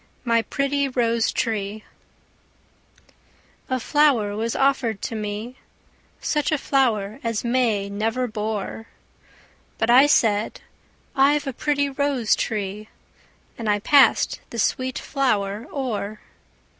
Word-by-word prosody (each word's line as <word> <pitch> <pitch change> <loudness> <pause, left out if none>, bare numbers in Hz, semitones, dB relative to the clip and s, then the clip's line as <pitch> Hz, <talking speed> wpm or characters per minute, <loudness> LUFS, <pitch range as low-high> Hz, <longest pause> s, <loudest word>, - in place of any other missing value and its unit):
MY 230 -1 +3
PRETTY 275 +3 -1
ROSE 235 -3 +1
TREE 215 -2 -2 1.9
A 260 -1 0
flower 250 -8 +2
was 225 +2 -2
offered 265 -6 +1
to - - -3
me, 215 +4 -5 0.6
Such 300 0 0
a 310 - +2
flower 235 -6 0
as 230 -2 -2
May 235 -5 +1
never 220 +5 -1
bore; 215 -1 -4 0.9
But 225 +1 +1
I 265 +4 +7
said, 220 -7 +2 0.5
'I've 285 +2 +3
a 270 - -3
pretty 285 +2 0
rose 275 -4 +1
tree,' 210 0 -3 0.7
And 225 -2 -2
I 205 - +3
passed 275 +6 +4
the 235 - -7
sweet 255 +3 0
flower 215 -6 -1
o'er. 215 -6 -3
230 Hz, 115 wpm, -23 LUFS, 215-270 Hz, 1.9 s, I